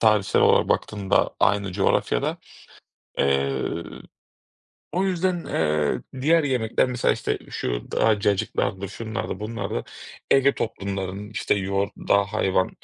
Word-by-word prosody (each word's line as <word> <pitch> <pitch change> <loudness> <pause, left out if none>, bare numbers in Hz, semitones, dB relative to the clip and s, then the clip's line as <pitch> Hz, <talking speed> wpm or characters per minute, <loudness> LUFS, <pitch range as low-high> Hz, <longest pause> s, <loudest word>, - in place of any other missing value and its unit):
tarihsel 105 -3 +3
olarak - - +4
baktığında 100 -3 +1
aynı 100 -2 +2
coğrafyada. 95 +1 +1 0.8
Eee, 70 -1 +1 1.3
o 185 +2 +1
yüzden, 180 -2 0
eee, 75 -2 0 0.2
diğer 160 +3 +4
yemekler, 125 -5 +1
mesela, 125 -1 +1
işte, - - -2
şu - - -3
daha 110 -2 +3
cacıklardır, 100 -1 0
şunlardı, 110 +1 -5
bunlardı, 105 - -3 0.5
Ege 135 0 +5
toplumlarının, 100 -1 -4
işte, 110 - 0
yoğurt, 100 +1 -1
dağ, 100 0 +2
hayvan, 95 -2 0
100 Hz, 110 wpm, -24 LUFS, 95-115 Hz, 1.3 s, Ege